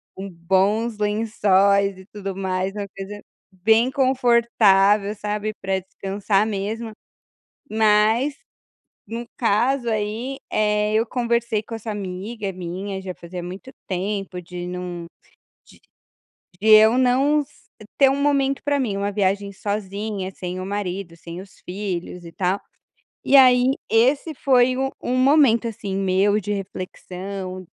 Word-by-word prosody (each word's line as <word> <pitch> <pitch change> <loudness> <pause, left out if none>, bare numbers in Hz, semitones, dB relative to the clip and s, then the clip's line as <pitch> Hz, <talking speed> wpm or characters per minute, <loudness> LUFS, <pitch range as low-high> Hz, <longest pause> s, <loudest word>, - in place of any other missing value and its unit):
com 195 +1 -6
bons 195 +6 +1
lençóis 200 -2 +2
e 190 - -13
tudo 195 -2 -6
mais", 190 0 -1
uma 205 -1 -5
coisa 195 +2 -8 0.3
bem 220 +7 +3
confortável, 235 -6 +3
sabe, 210 0 -3
pra 190 0 0
descansar 195 +2 -1
mesmo, 220 +2 -4 0.8
mas 220 +6 +3 0.7
no 230 +3 -5
caso 240 +3 +1
aí, 220 +5 -2
eh, 210 0 +1
eu 220 +1 +3
conversei 235 -2 0
com 230 - -10
essa 225 0 -6
amiga 200 +1 -5
minha, 185 +2 -5
já 190 -1 -5
fazia 175 +1 -8
muito 185 +8 -8 0.2
tempo 195 0 -3
de 175 0 -7
num 180 -1 -5 1.6
de 215 - -3
de 215 - +10
eu 220 +3 +6
não 265 +4 +3
s 290 0 -12 0.3
ter 275 -1 +5
um 275 +1 -1
momento 275 -1 +1
pra 285 0 +1
mim, 220 -7 -1
uma 200 +1 -1
viagem 200 0 0
sozinha, 200 0 -4
sem 180 0 -5
o 185 - -5
marido, 195 -3 -4
sem 170 +1 -9
os 195 0 -15
filhos 180 -2 -5
e 165 - -10
tal, 185 +2 0 0.7
e 280 - +4
aí 255 -1 +6 0.2
esse 275 +7 +2
foi 255 -1 +3
o 270 0 -1
o - - -6
momento, 255 -3 +4
assim, 200 -3 -5
meu 195 +2 +2
de 205 0 -3
reflexão, 185 -1 -6
205 Hz, 135 wpm, -22 LUFS, 190-235 Hz, 1.6 s, de